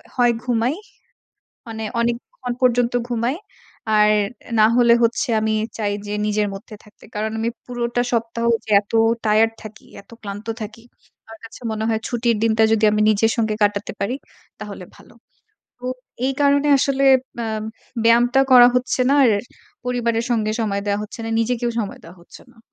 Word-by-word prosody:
হয় 245 -1 +3
ঘুমাই। 245 +2 0 0.9
মানে 220 0 -5 0.2
অনেকক্ষণ 245 - -3
পর্যন্ত 245 -1 +3 0.2
ঘুমাই। 240 +3 -1 0.6
আর, 210 0 +5 0.5
না 215 - +7
হলে 235 -1 +5
হচ্ছে 235 +4 +1
আমি 220 0 0 0.2
চাই 205 -2 -1
যে 205 - -4
নিজের 210 0 0
মধ্যে 205 +2 -10
থাকতে। 210 - -20
কারণ 215 +1 -2
আমি 225 +1 -1 0.2
পুরোটা 240 0 -2
সপ্তাহ 230 0 -1 0.2
যে 220 - -10
এত 200 - -19 0.3
টায়ারড 220 +1 +3
থাকি, 215 0 -12 0.2
এত 200 - -26
ক্লান্ত 205 0 -7 0.2
থাকি, 215 +2 -9 0.4
আমার 225 0 -13
কাছে 225 - -12
মনে 220 0 -3
হয় 220 -1 0
ছুটির 235 -1 0
দিনটা 225 0 +2
যদি 220 -1 +2
আমি 215 - +1
নিজের 215 +1 +2
সঙ্গে 220 -2 0
কাটাতে 205 0 0
পারি 225 +6 -1 0.4
তাহলে - - -8
ভালো। - - -18 0.6
তো 245 - -15 0.4
এই 270 - 0
কারণে 285 +1 +3
আসলে 275 0 +1 0.4
আ - - -3 0.6
ব্যায়ামটা 240 +3 +4
করা 245 -1 +9
হচ্ছে 250 +1 0
না - - +4
আর 230 - +4 0.5
পরিবারের 235 -2 -1
সঙ্গে 215 -2 0
সময় 200 -3 -1
দেয়া 200 0 0
হচ্ছে 210 +2 -9
না। - - -4
নিজেকেও 240 +1 -1
সময় 205 - -5
দেওয়া 170 +3 -13
হচ্ছে 170 - -15
না। 240 - -24
230 Hz, 165 wpm, -21 LUFS, 215-245 Hz, 0.9 s, করা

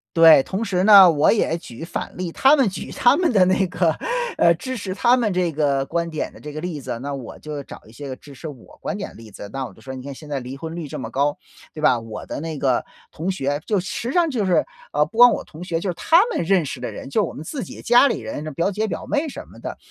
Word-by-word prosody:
对， 165 -4 +8
同 195 +4 -3
时 185 -4 0
呢， 195 -4 +9
我 150 -1 +3
也 170 -6 +1
举 125 -4 -10
反 165 - -5
例， 180 -2 -4
他 270 - +5
们 265 -7 +3
举 190 - -7
他 245 +4 +4
们 350 -7 +1
的 190 -3 +5
那 185 +1 +2
个， 175 -2 +1 0.5
呃， 170 - +5
支 255 +10 -5
持 190 -3 -4
他 240 +5 +3
们 215 -5 0
这 180 -2 +1
个 140 -3 +1
观 170 0 -1
点 155 - -3
的 - - -15
这 150 0 -8
个 155 - -5
例 175 -4 -4
子， 120 -3 -5
那 140 +1 -4
我 130 -4 -8
就 150 -2 -6
找 - - -11
一 - - -15
些 140 +5 -9
个 130 - -5
支 140 +1 -15
持 160 - -8
我 140 -6 -12
观 - - -4
点 200 - -5
的 - - -17
例 110 -2 -13
子。 100 +1 -9
那 135 +2 -3
我 - - -10
就 - - -19
说 130 - -8
你 130 - -8
看 140 +1 -6
现 150 +2 -12
在 140 - -2
离 130 +1 -7
婚 160 +3 -7
率 165 -4 -5
这 - - -6
么 - - -5
高， 145 +2 0 0.4
对 155 - -8
吧？ 125 -6 +4
我 115 -1 -8
的 - - -5
那 160 -2 -5
个 130 -3 +1 0.3
同 175 +5 -3
学， 145 -4 -2
就 205 -3 +1
实 210 +6 -4
际 - - -3
上 345 -2 +3
就 230 -7 -1
是， 180 -2 +3 0.3
呃， 150 - +3
不 220 +9 -8
光 245 0 +9
我 - - -3
同 160 +2 -11
学， 165 -2 -2
就 185 - -3
是 175 - -3
他 325 - +3
们 480 - -2
认 185 0 +3
识 135 -3 -6
的 125 - -4
人， - - -8
就 210 +8 +2
我 - - -7
们 150 - -8
自 260 - -5
己 - - -10
家 240 +4 +5
里 240 - -1
人 110 +7 -6
的 155 - -5
表 170 +7 0
姐 215 +2 -1
表 - - -5
妹 295 +2 0
什 285 - -8
么 - - -16
的， - - -6
165 Hz, 315 characters per minute, -22 LUFS, 140-200 Hz, 0.5 s, 呢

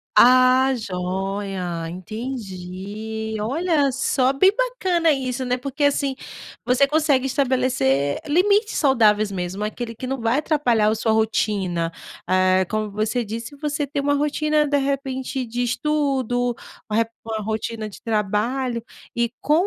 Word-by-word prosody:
Ah, 255 +2 +6
joia, 190 -3 -3
entendi. 215 +1 -6
Olha, 290 +5 +1
só 260 +1 +1
bem 380 +8 +5
bacana 375 -10 +1
isso, 260 -2 -3
né, 250 0 0
porque, 275 +3 -4
assim, 280 -1 +1 0.5
você 255 +3 +4
consegue 295 -3 +2
estabelecer 250 - +1
limites 405 +7 +3
saudáveis, 215 -7 +3
mesmo 185 +2 -4
aquele 230 +2 -4
que 255 - -6
não 265 +1 -2
vai 235 +4 +1
atrapalhar 250 -9 +2
a 220 - +1
sua 220 0 0
rotina, 195 -6 0 0.4
eh, 185 0 +3
como 215 +1 -3
você 215 +4 -1
disse, 230 +6 -6
você 295 -1 -1
tem 285 0 -2
uma 285 +1 +1
rotina 300 +1 +1
de 285 0 +2
repente 270 -1 -2
de 240 +2 -2
estudo, 255 -2 0 0.4
uma 210 - 0
re - - +1 0.2
uma 220 -1 -4
rotina 220 0 -3
de 205 - -12
trabalho 230 +3 -1 0.3
e 235 -1 0
com 300 - +1
245 Hz, 135 wpm, -22 LUFS, 210-275 Hz, 0.5 s, Ah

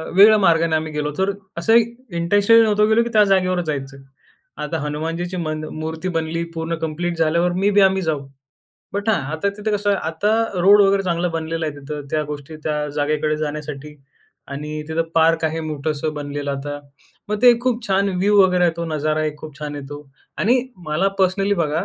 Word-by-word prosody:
वेगळ्या 215 +3 +8
मार्गाने 165 -3 +3
आम्ही 155 0 -2
गेलो 150 0 -2
होतो. 170 +6 -1
तर 200 - +1 0.3
असंही 225 +7 +5 0.3
इंटेंशनली 205 +6 +4
नव्हतो 210 -1 +3
गेलो, 220 +2 +4
की 235 - -4
त्या 215 -1 +6
जागेवर 185 -1 +2
जायचं. 135 -2 -4 0.7
आता 165 +2 -2
हनुमानजीची 165 +4 -3
मन 155 -2 -3 0.2
मूर्ती 160 +3 -4
बनली 165 +1 -2
पूर्ण 165 +1 -2
कंप्लीट 170 +2 -2
झाल्यावर 170 +2 +2
मे 200 - +3
बी 205 - +6
आम्ही 190 0 +3
जाऊ. 150 -5 -2 0.7
बट 200 +2 -2
हां, 220 - +2
आता 160 +5 -1
तिथं 215 +1 -2
कसं 205 0 0
आहे 200 - +1
आता 185 +6 0 0.3
रोड 200 +3 +7
वगैरे 195 0 +3
चांगला 175 -1 0
बनलेला 165 -1 -3
आहे 150 - -4
तिथं, 145 0 -7
त्या 155 - 0
गोष्टी 145 +2 -8
त्या 150 -1 -1
जागेकडे 150 +1 0
जाण्यासाठी. 150 -1 -5 0.5
आणि 150 +2 -5
तिथं 160 +1 0
पार्क 165 0 +3
आहे 160 +1 -3
मोठंस 150 0 -3
बनलेलं 145 0 -4
आता. 145 +1 -5 0.5
मग 210 0 -1
ते 245 -2 +7
खूप 240 -2 -1
छान 195 +1 +2
व्ह्यू 205 +2 +4
वगैरे 180 -1 +3
आहे. 170 - +3
तो 170 - -3
नजारा 155 +1 0
एक 150 -1 -3
खूप 150 -2 -10
छान 150 -1 -5
येतो. 145 +1 -8 0.3
आणि 245 +5 +3 0.3
मला 165 +6 +1
पर्सनली 195 +2 +2
बघा. 160 +2 0
165 Hz, 185 wpm, -20 LUFS, 150-195 Hz, 0.7 s, वेगळ्या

